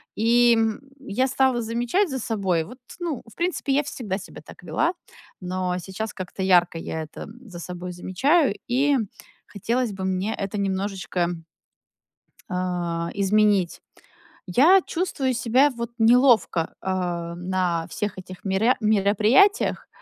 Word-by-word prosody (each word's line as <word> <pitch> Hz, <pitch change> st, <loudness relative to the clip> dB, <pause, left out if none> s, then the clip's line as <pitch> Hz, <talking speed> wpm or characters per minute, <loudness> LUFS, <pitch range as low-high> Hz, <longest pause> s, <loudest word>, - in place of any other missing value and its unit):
И, 235 Hz, +2 st, +4 dB
м, 225 Hz, +1 st, 0 dB, 0.2 s
я 260 Hz, 0 st, -1 dB
стала 265 Hz, -2 st, +2 dB
замечать 240 Hz, -, 0 dB
за 265 Hz, -2 st, -3 dB
собой. 195 Hz, -7 st, 0 dB
Вот, 245 Hz, +7 st, -12 dB, 0.2 s
ну, 330 Hz, -8 st, -3 dB
в -, -, -19 dB
принципе, 340 Hz, -5 st, -1 dB
я 290 Hz, +2 st, +2 dB
всегда 215 Hz, -9 st, -4 dB
себя 195 Hz, -, -11 dB
так -, -, -13 dB
вела, 340 Hz, +3 st, 0 dB, 0.5 s
но 180 Hz, 0 st, -2 dB
сейчас 190 Hz, +5 st, -5 dB
как-то 185 Hz, 0 st, -6 dB
ярко 175 Hz, -2 st, +4 dB
я 160 Hz, -1 st, -4 dB
это 155 Hz, -, -9 dB, 0.2 s
за 195 Hz, -9 st, -10 dB
собой 180 Hz, +1 st, -6 dB
замечаю, 270 Hz, -, +2 dB
и 275 Hz, +3 st, +2 dB, 0.5 s
хотелось 230 Hz, +3 st, -2 dB
бы 190 Hz, -1 st, -6 dB
мне 190 Hz, +3 st, -1 dB
это 200 Hz, +1 st, -4 dB
немножечко 190 Hz, -2 st, -1 dB, 1.2 s
а, 175 Hz, -2 st, -2 dB
изменить. 200 Hz, -2 st, +2 dB, 0.7 s
Я 315 Hz, -, +6 dB
чувствую 290 Hz, -7 st, -1 dB
себя, 250 Hz, +4 st, +3 dB
вот, 235 Hz, -1 st, -5 dB
неловко, 230 Hz, -7 st, +4 dB
а, 175 Hz, -3 st, -2 dB
на 180 Hz, -2 st, -1 dB
всех 210 Hz, -4 st, -4 dB
этих 185 Hz, 0 st, -11 dB
меря 200 Hz, +6 st, +2 dB
мероприятиях, 215 Hz, -, +3 dB
210 Hz, 130 wpm, -24 LUFS, 185-250 Hz, 1.2 s, Я